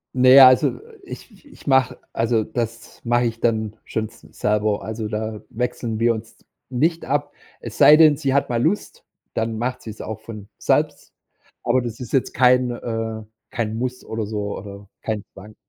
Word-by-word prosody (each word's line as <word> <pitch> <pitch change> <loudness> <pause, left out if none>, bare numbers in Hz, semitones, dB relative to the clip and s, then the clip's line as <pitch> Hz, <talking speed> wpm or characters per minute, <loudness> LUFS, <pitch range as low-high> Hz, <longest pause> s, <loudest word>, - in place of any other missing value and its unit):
Ne, 130 +1 +8
also 130 0 +5 0.2
ich 370 - -12
ich 285 - -17
mach 130 -1 +4 0.2
also 115 -1 +1
das 115 0 -5
mache 120 +1 +2
ich 115 -1 -3
dann 110 -2 0
schon 110 -1 -3
s - - -19
selber. 105 0 0
Also, 110 0 -4
da 110 0 -4
wechseln 115 -1 -3
wir 115 0 +3
uns 110 0 -9 0.3
nicht 160 +7 0
ab. 145 +2 -1 0.3
Es - - -8
sei 150 - +8
denn, 155 -2 +6
sie 135 -3 -1
hat 140 - +1
mal 120 -1 0
Lust, 190 +9 -2 0.3
dann 110 0 -1
macht 125 +2 -3
sie's 110 -1 -8
auch 110 -1 -6
von 105 -3 -10
selbst. - - 0 0.5
Aber 130 - +2
das 120 -2 -6
ist 125 -4 -8
jetzt 135 - +1
kein, 125 -1 +4
äh, 115 -2 -4 0.3
kein 110 -2 -2
Muss 125 +1 -4
oder 110 -1 -4
so 105 -1 -4
oder 100 0 -10
kein 110 -2 -3
Zwang. 105 +2 -13
115 Hz, 175 wpm, -22 LUFS, 110-125 Hz, 0.5 s, Ne